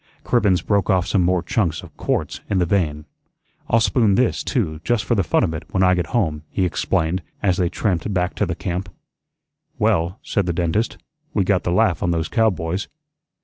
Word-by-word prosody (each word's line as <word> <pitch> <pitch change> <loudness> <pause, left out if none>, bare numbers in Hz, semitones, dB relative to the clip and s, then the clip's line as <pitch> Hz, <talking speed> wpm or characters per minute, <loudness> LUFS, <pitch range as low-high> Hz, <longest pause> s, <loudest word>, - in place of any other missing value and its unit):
Cribbens 105 -7 +2
broke 100 -2 +1
off 95 -3 +3
some 95 - +1
more 90 0 +2
chunks 85 -7 -1
of - - -13
quarts - - -2
in 100 - +1
the 90 - +3
vein. 80 -5 0 0.6
"I'll 115 - +4
spoon 110 -3 +3
this 125 +1 +1
too, 80 - -1
just 120 -1 +1
for 120 - +1
the 105 - +2
fun 90 - +2
of 80 - 0
it, 80 +1 -5
when 95 - +1
I 90 0 +5
get 90 -2 -1
home," 80 -9 0
he 95 - 0
explained, 85 0 0 0.2
as 95 -3 +2
they 90 -2 +1
tramped 95 +1 -1
back 90 -2 0
to 105 - +1
the 85 - -2
camp. 90 0 -4 0.9
"Well," 85 +4 +1
said 100 -4 -1
the 85 - 0
dentist, 90 +6 0 0.4
"we 100 - +3
got 95 -1 +2
the 85 - 0
laugh 90 0 +2
on 90 - +1
those 80 -2 -1
cowboys." 95 -4 0
90 Hz, 200 wpm, -21 LUFS, 85-100 Hz, 0.9 s, I